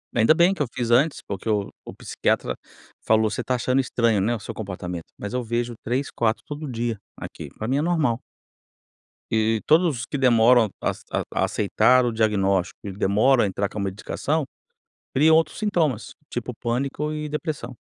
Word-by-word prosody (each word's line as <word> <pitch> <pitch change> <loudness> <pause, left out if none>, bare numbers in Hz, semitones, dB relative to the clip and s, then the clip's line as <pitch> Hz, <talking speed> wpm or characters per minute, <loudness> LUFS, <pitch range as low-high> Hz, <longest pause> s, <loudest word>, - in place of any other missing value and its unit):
Ainda 115 +6 +5
bem 175 +3 +4
que 190 - -5
eu 145 - +1
fiz 120 -1 -2
antes, 140 +6 +3
porque 100 +2 -4
o 105 -2 0 0.2
o - - -8
psiquiatra - - -1 0.5
falou: 110 0 +3
"Você - - -3
está 130 - -1
achando 130 +2 +1
estranho, 115 -5 +1
né, 120 +4 +1
o - - -6
seu 110 - -7
comportamento", 90 -4 -6
mas 105 - -6
eu 125 -1 -1
vejo 120 +1 -2
3, 130 +4 -1
4 110 -1 0
todo 150 -2 -6
dia 115 -2 -2 0.2
aqui, - - -8
para 110 - -4
mim 135 - +1
é 145 - +1
normal. 155 -8 +1 1.1
E 110 0 +2
todos 160 -4 +3
os 115 - -4
que 145 - -4
demoram 120 -2 +5
as - - -2
a - - 0
a - - +2
aceitar 115 +5 +3
o 120 - +1
diagnóstico 100 -4 +1
e 100 - -4
demoram 105 +7 +3
a - - +2
entrar 100 +1 -2
com 105 - -6
a - - -1
medicação, 130 +10 -2 0.7
criam 160 +3 +6
outros 160 - +1
sintomas, 165 - 0 0.2
tipo 120 +1 -4
pânico 135 +6 -2
e 150 -1 -4
depressão. 150 -5 -4
120 Hz, 190 wpm, -24 LUFS, 110-140 Hz, 1.1 s, criam